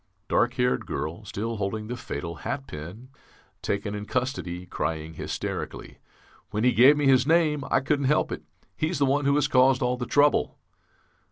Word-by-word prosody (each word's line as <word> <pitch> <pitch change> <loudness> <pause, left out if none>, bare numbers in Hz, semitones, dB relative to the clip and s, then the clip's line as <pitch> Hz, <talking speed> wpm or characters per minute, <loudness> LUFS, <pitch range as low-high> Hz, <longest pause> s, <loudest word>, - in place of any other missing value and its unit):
Dark 120 +1 +2
haired 125 -1 0
girl, 80 +8 -4
still 110 +3 -4
holding 105 +2 -3
the 120 +3 -4
fatal 85 -7 -6
hat 135 0 -4
pin, 90 - -9 0.5
taken 100 0 -2
in 105 0 -5
custody, 115 -9 -3
crying 80 -2 -3
hysterically - - -5 0.5
'When 105 +3 -2
he 125 - +5
gave 135 +6 +6
me 145 - +1
his 130 -1 +4
name, 155 -3 +3
I - - +3
couldn't 140 0 0
help 150 +3 +2
it. - - -4 0.3
He's 160 +3 -1
the 140 - +3
one 140 +1 +1
who 140 0 +3
has 145 - +2
caused 130 0 +4
all 125 0 0
the 125 -1 -4
trouble!' 145 0 +3
125 Hz, 175 wpm, -26 LUFS, 100-140 Hz, 0.5 s, gave